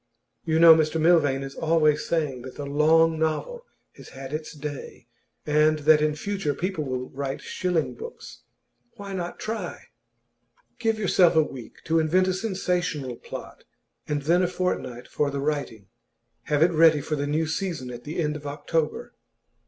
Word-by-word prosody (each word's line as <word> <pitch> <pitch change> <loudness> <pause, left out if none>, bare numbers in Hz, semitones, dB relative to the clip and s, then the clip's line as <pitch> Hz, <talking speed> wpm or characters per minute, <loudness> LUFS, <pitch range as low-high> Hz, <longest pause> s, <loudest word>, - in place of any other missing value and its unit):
You 160 -1 +1
know 165 0 +10
Mr 160 0 +1
Milvain 155 -5 +3
is 135 0 -7
always 155 -2 +2
saying 150 -7 -1
that 130 +1 -9
the 145 - -6
long 160 +3 +3
novel 470 - -2 0.3
has - - -12
had 135 +1 -9
its 155 0 -4
day, 145 -5 -7 0.4
and 150 +1 +3
that 155 -1 +6
in 150 0 +1
future 180 -3 -2
people 180 0 -2
will 130 -2 -4
write 135 0 -4
shilling 180 -4 -1
books. 465 +2 -10 0.5
Why 200 -1 -8
not 175 -2 -4
try? 215 -5 -5 0.9
Give 225 -1 +1
yourself 185 -4 +4
a 160 - +6
week 130 -5 -10
to 165 0 +2
invent 180 +4 +2
a 185 - +1
sensational 180 - -2
plot, - - -9 0.4
and 145 -1 -2
then 170 +4 +3
a 180 - +2
fortnight 175 -9 -3
for 145 - -1
the 140 0 -3
writing. 140 -8 -3 0.6
Have 150 +1 +2
it 175 - +4
ready 160 -2 +5
for 150 - -2
the 145 0 -2
new 155 +2 0
season 160 -6 -3
at 120 0 -9
the 155 +6 -5
end 150 -2 0
of 150 -1 -7
October. 150 +2 -2
155 Hz, 170 wpm, -25 LUFS, 145-175 Hz, 0.9 s, know